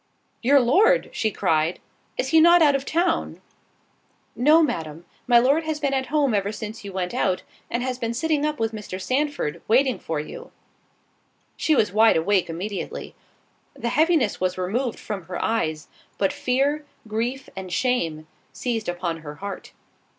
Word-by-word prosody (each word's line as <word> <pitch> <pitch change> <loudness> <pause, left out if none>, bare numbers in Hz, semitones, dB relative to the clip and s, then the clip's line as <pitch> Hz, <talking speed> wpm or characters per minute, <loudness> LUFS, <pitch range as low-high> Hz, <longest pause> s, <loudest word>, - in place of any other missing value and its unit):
"Your 275 +4 +5
Lord!" 370 - +3
she 220 - 0
cried, 160 -3 0 0.4
"Is 260 - -1
he 320 +2 +6
not 340 +1 +7
out 290 -2 +5
of 275 0 -1
town?" 335 +1 0 1.0
"No, 305 +6 +5
Madam, 160 - -3 0.2
my 240 -1 +6
Lord 275 +7 +4
has 310 -1 -2
been 280 -2 0
at 265 -1 0
home 285 -3 +1
ever 200 0 0
since 215 +1 -7
you 200 - -7
went 185 -1 -3
out; 185 -1 0 0.3
and 240 +1 -1
has 255 -1 -3
been 230 -1 -2
sitting 300 +3 0
up 300 0 -1
with 225 0 0
Mr. 210 -4 -6
Sandford, 260 - -1
waiting 255 +2 +3
for 160 -2 -3
you." 150 - -8 1.0
She 310 - +2
was 210 -7 +2
wide 220 -1 +5
awake 185 +2 +1
immediately. 190 +5 -5 0.6
The 235 - -3
heaviness 310 - +2
was 185 0 0
removed 225 +7 -1
from 195 -5 -6
her 180 +1 -5
eyes, 160 -9 -1 0.3
but 195 - +1
fear, 275 +4 0 0.2
grief, 235 +5 -3
and 190 -1 -7
shame, 170 -11 0 0.3
seized 230 -6 -2
upon 175 -1 -2
her 150 -2 -9
heart. 200 +5 -7
230 Hz, 165 wpm, -24 LUFS, 185-275 Hz, 1.0 s, not